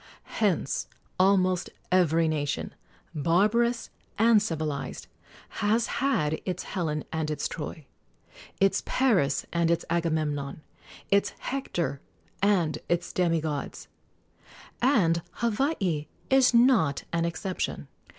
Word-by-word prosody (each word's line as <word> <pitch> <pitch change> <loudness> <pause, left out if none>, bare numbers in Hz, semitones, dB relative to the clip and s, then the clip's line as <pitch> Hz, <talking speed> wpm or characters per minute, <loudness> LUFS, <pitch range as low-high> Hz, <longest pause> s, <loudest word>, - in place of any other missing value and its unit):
Hence 185 -9 +1 0.3
almost 185 -1 +3 0.2
every 165 -3 +3
nation, 145 -3 -2 0.4
barbarous 210 +10 +2 0.3
and 225 -1 +5
civilized, 155 -7 -3 0.6
has 220 +2 +2 0.2
had 155 - +1
its 180 -2 -3
Helen 155 -6 -2
and 160 -1 -1
its 150 - -1
Troy, 155 -1 -7 0.7
its 195 0 +3
Paris 200 - +2
and 170 -1 +2
its 170 0 +1
Agamemnon, 155 -4 -1 0.5
its 200 0 +3
Hector 175 - -3 0.4
and 175 -7 +2
its 175 0 -1
demi 170 -3 +2
gods; 150 -2 -5 0.9
and 190 -11 +3
Hawaii 210 - 0 0.2
is 265 -1 +6
not 235 - +4
an 165 0 +1
exception. 180 +2 -3
170 Hz, 100 wpm, -27 LUFS, 155-210 Hz, 0.9 s, is